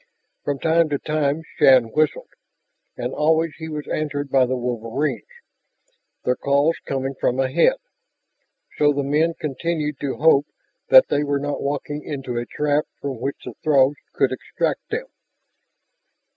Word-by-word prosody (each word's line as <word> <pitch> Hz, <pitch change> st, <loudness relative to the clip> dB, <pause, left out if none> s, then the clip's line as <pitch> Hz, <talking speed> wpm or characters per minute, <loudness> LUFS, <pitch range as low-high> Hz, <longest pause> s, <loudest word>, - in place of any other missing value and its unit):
From 145 Hz, -1 st, -1 dB
time 165 Hz, +2 st, +2 dB
to 145 Hz, -, 0 dB
time 150 Hz, +1 st, -1 dB
Shann 125 Hz, -4 st, +5 dB
whistled. 155 Hz, +2 st, 0 dB, 0.7 s
And 125 Hz, +2 st, -3 dB
always 160 Hz, +1 st, +2 dB
he 160 Hz, 0 st, -6 dB
was 150 Hz, -1 st, -5 dB
answered 145 Hz, -2 st, -3 dB
by 130 Hz, -2 st, +4 dB
the 130 Hz, +1 st, -1 dB
wolverines, 125 Hz, +4 st, -2 dB, 1.0 s
their 125 Hz, -, +2 dB
calls 140 Hz, +5 st, +2 dB
coming 135 Hz, 0 st, -2 dB
from 125 Hz, +1 st, +1 dB
ahead. 135 Hz, -, +3 dB, 1.0 s
So 145 Hz, -1 st, +4 dB
the 140 Hz, 0 st, -1 dB
men 155 Hz, +4 st, +1 dB
continued 150 Hz, 0 st, -2 dB
to 140 Hz, -2 st, -2 dB
hope 145 Hz, -2 st, +4 dB, 0.4 s
that -, -, +8 dB
they 145 Hz, -, +1 dB
were 145 Hz, -1 st, 0 dB
not 145 Hz, +1 st, -3 dB
walking 145 Hz, +1 st, -3 dB
into 135 Hz, -4 st, -5 dB
a 120 Hz, -, -5 dB
trap 150 Hz, 0 st, 0 dB
from 135 Hz, -4 st, -5 dB
which 135 Hz, +3 st, -3 dB
the 125 Hz, -, -6 dB
Throgs 140 Hz, -1 st, +4 dB, 0.2 s
could -, -, +2 dB
extract -, -, -3 dB
them. 460 Hz, +3 st, -3 dB
145 Hz, 145 wpm, -22 LUFS, 135-155 Hz, 1.0 s, that